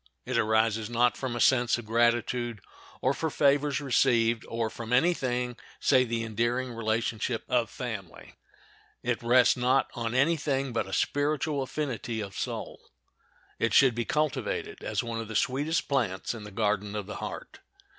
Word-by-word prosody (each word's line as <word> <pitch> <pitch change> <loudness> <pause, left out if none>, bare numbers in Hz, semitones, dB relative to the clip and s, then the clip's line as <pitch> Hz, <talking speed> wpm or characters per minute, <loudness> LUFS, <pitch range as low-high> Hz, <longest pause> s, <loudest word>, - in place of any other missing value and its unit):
It 130 0 -3
arises, 110 -1 +2
not 120 +1 +2
from 130 -3 -4
a - - -3
sense 125 -2 +4
of 120 - -8
gratitude, 120 0 +1 0.4
or 130 - +2
for 160 +3 -2
favors 145 -1 +2
received, 120 -4 +2
or 115 -1 -2
from 115 0 -7
any 160 +8 +4
thing 125 -4 -2 0.2
save 130 -3 +3
the 115 -1 -1
endearing 120 +3 -1
relationship 115 +1 -1
of 120 -2 +1
family. 110 -9 -7 0.7
It 120 -2 -1
rests 120 +1 +5
not 130 +2 +2
on 115 0 -3
any 155 +6 +3
thing 135 -3 -1
but 115 - -1
a - - -9
spiritual 145 0 0
affinity 130 -5 -3
of 100 -3 -6
soul. - - -5 0.8
It 115 - +1
should 135 -3 +6
be 120 0 -2
cultivated 150 +2 -2
as - - -1
one 115 -1 -4
of 115 - -7
the 110 - -7
sweetest 145 +8 0
plants 115 -10 -1
in 110 -3 -8
the - - -8
garden 105 -1 -1
of 105 -2 -3
the 105 - -7
heart. - - -7
120 Hz, 165 wpm, -28 LUFS, 115-130 Hz, 0.8 s, should